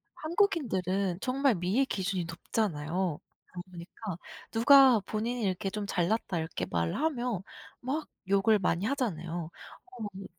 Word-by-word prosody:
한국인들은 200 - 0
정말 265 0 +2
미의 190 +10 +1
기준이 190 -6 -1
높잖아요. 165 -1 -2 0.3
그러다 180 - -7
보니까 180 +2 -7 0.3
누가 260 0 +7
본인이 225 +4 -2
이렇게 195 +1 0
좀 205 +1 -4
잘났다 190 0 0
이렇게 160 - -3
말하면 240 - -1 0.4
막 285 +5 -2 0.2
욕을 200 +2 +4
많이 180 +1 +1
하잖아요. 175 - -2 0.4
어 235 -4 -7
그 195 - -7
200 Hz, 295 characters per minute, -30 LUFS, 175-245 Hz, 0.4 s, 누가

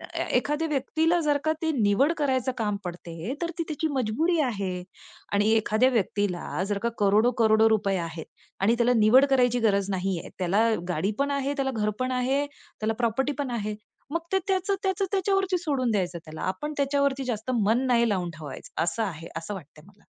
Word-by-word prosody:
ए - - 0
एखाद्या 300 +2 0
व्यक्तीला 320 +4 +1
जर 295 -2 +2
का 315 - +3
ती 320 -1 +1
निवड 210 +10 +3
करायचं 260 -3 +1
काम 210 -3 -1
पडते 175 +4 -5
तर 340 0 -1
ती 335 - 0
त्याची 310 +1 -1
मजबुरी 280 +8 +1
आहे 195 -8 -2 0.5
आणि 205 +1 +3
एखाद्या 220 +3 +3
व्यक्तीला 205 -6 -1
जर 205 - 0
का 235 - +2
करोडो-करोडो 220 +1 +4
रुपये 200 -3 +1
आहेत 165 -1 -5 0.4
आणि 220 +4 +4
त्याला 240 +1 +3
निवड 225 +6 +6
करायची 245 -2 +3
गरज 200 -3 +2
नाही 190 -1 -1
आहे. - - -9
त्याला 200 +6 +2 0.2
गाडी 180 +4 0
पण 280 0 +1
आहे, 280 0 -1
त्याला 275 -2 -1
घर 210 -1 +1
पण 255 0 0
आहे, 260 +3 +1
त्याला 225 -6 -5
प्रॉपर्टी 245 +4 +1
पण 275 -3 -2
आहे, 215 -3 -2 0.4
मग 335 - 0
ते - - +5
त्याचं-त्याचं 385 0 0
त्याच्यावरती 390 -1 +1
सोडून 280 -8 0
द्यायचं 180 -4 -1
त्याला, 155 0 -8
आपण 295 +12 -3
त्याच्यावरती 280 -1 +1
जास्त 240 -1 -3
मन 225 +6 +2
नाही 235 -2 +3
लावून 185 -4 -1
ठेवायचं 150 -1 -5
असं 175 +7 -1
आहे, 165 -5 -5
असं 165 +5 -5
वाटतंय 150 -4 -12
मला. 205 0 -21
235 Hz, 180 wpm, -26 LUFS, 200-280 Hz, 0.5 s, निवड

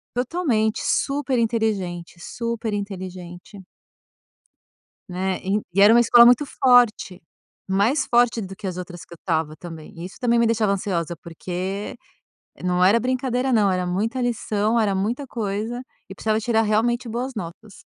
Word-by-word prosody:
Totalmente! 245 -5 0
Super 275 -3 0
inteligente, 200 -7 -2
super 230 +2 -4
inteligente! 185 -1 -7 1.5
Né, 185 +1 -2
e 200 +3 0
e 200 - +3
era 210 +2 +8
uma 235 - +6
escola 240 0 +7
muito 250 +4 +5
forte, 245 -9 +3 0.5
mais 205 +10 +2
forte 240 -1 +2
do 195 0 -7
que 210 - -10
as 180 -1 -4
outras 175 -1 -8
que - - -14
eu - - -12
estava 160 -3 -1
também. 165 +3 -10
Isso 185 - -8
também 235 -1 +2
me 235 - +4
deixava 225 -2 +1
ansiosa, 175 -4 -2
porque 185 +5 -5 0.7
não 180 0 +1
era 205 +5 +5
brincadeira, 255 +1 -1
não, 210 -4 +3
era 180 -1 -1
muita 220 +8 -1
lição, 220 -2 0
era 210 -3 +2
muita 220 +9 -2
coisa 220 +2 -3 0.3
e - - -7
precisava 215 +1 0
tirar 225 0 +1
realmente 230 +3 0
boas 250 +4 -3
notas. 205 +2 -9
215 Hz, 150 wpm, -23 LUFS, 185-235 Hz, 1.5 s, era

